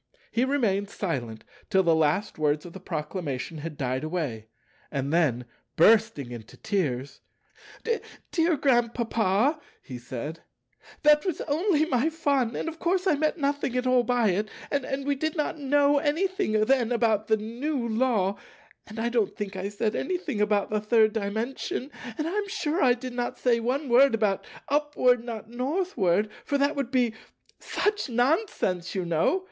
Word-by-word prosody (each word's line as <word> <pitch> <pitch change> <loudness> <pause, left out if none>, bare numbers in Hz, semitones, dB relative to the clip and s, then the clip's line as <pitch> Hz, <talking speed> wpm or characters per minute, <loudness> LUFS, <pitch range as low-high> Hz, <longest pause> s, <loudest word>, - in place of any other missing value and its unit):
He 240 +2 +2
remained 210 -8 +1
silent 125 - -4 0.3
till 190 0 +4
the 170 -2 +4
last 160 +5 +1
words 150 +1 +1
of 175 - -10
the 190 - -8
Proclamation 155 -3 -4
had 155 -1 -6
died 130 0 -2
away, 150 -10 -3 0.4
and 140 +1 -2
then, 135 -8 +2 0.3
bursting 160 - +4
into 115 -2 -10
tears, 140 -9 -2 1.1
"Dear 330 -2 +2
Grandpapa," 235 - +2 0.2
he 125 -3 -9
said, 130 +6 -6 0.6
"that 300 0 +6
was 365 -5 -2
only 315 +1 +1
my 270 0 +1
fun, 280 -7 0
and - - -3
of 325 0 -5
course 365 +2 +1
I 375 - +4
meant 305 +3 0
nothing 280 -3 -1
at 250 - 0
all 255 -1 +4
by 240 -2 +2
it; 210 +4 -1 0.2
and 275 -1 -2
we 285 - +2
did 315 +4 -2
not 300 0 -1
know 285 +1 +3
anything 370 - 0
then 250 -2 +2
about 220 -3 +1
the 220 - +3
new 240 +4 -3
Law; 220 -4 +1 0.5
and 215 - -10
I 230 +1 0
don't 235 -4 0
think 205 -2 -4
I 190 +1 -3
said 210 +1 -1
anything 345 - -2
about 210 -1 +1
the 215 -1 0
Third 215 0 +3
Dimension; 225 +6 -3 0.3
and 310 - -1
I - - -2
am 415 0 -1
sure 365 -4 -1
I 250 -2 +5
did 250 0 -7
not 245 0 -3
say 240 -2 +2
one 260 +5 -1
word 255 +1 +5
about 210 -3 0 0.2
'Upward, 280 -4 +2
not 225 -2 -7
Northward,' 240 - 0
for 285 - 0
that 285 +2 +1
would 275 -4 -2
be 250 -4 +2 0.5
such 415 -7 -1
nonsense, 245 - 0
you 185 -2 -1
know. 170 - +2
235 Hz, 165 wpm, -27 LUFS, 190-285 Hz, 1.1 s, that